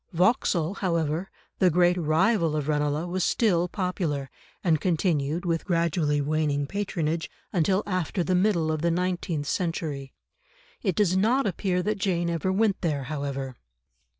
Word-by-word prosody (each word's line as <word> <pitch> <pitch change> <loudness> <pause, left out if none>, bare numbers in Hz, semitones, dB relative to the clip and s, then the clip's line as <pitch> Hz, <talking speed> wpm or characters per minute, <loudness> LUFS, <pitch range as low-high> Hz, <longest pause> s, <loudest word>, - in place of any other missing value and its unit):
Vauxhall, 180 -2 +2
however, 170 -1 -1 0.3
the 185 - +5
great 175 +1 +4
rival 170 +1 +2
of 150 -2 -2
Ranelagh, 150 +1 0
was 180 +1 -1
still 180 -6 +2
popular, 170 -8 -2 0.3
and 160 -4 +2
continued, 165 -2 0
with 165 -2 0
gradually 165 -4 +1
waning 145 -1 0
patronage, 165 -3 -2 0.2
until 190 +3 +2
after 185 -2 -1
the 185 - 0
middle 180 -4 +2
of 155 -1 -2
the 170 - +2
nineteenth 175 -3 -1
century. 155 -5 -3 0.7
It 190 -6 0
does 185 -2 +2
not 230 +8 +3
appear 185 -1 0
that 210 +1 -1
Jane 175 -4 0
ever 170 +3 -1
went 200 0 +1
there, 150 -5 -1
however. 135 -2 -4
170 Hz, 145 wpm, -26 LUFS, 155-185 Hz, 0.7 s, the